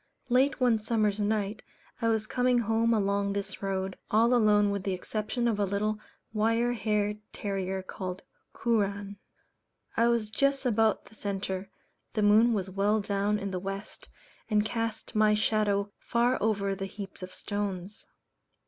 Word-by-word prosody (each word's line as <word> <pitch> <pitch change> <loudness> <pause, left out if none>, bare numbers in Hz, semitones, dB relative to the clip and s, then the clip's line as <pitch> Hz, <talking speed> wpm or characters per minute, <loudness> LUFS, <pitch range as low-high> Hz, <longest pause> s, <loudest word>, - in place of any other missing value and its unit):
Late 260 +3 +3
one 245 -3 +3
summer's 215 -2 +1
night 210 0 0 0.4
I 230 - +2
was 220 -1 +1
coming 250 +2 +2
home 225 0 +2
along 200 -2 +1
this 200 -1 -4
road, 190 -1 -2
all 230 +3 +4
alone 210 -3 +4
with 200 -1 -2
the 195 0 -1
exception 215 +6 -2
of 220 -3 0
a - - +3
little 210 +2 -1 0.3
wire 230 +3 +2
haired 210 -2 0
terrier 190 -2 -3
called 185 0 -6 0.3
Kooran. 200 -3 -1 0.8
I 230 - +4
was 230 -3 +1
just 275 +4 +1
about 225 -3 +2
the - - -17
centre; 195 -2 -3 0.4
the 215 - 0
moon 215 +3 +6
was 195 -4 0
well 200 +3 +1
down 200 0 0
in 200 -1 -4
the 185 - -2
West, 195 +2 -7 0.4
and 210 -1 +3
cast 225 0 -3
my 215 -1 +4
shadow 210 -1 +1
far 240 +2 +1
over 200 -2 +1
the 195 0 -4
heaps 195 -1 -8
of 185 0 -7
stones. 205 -1 -4
210 Hz, 155 wpm, -29 LUFS, 200-225 Hz, 0.8 s, moon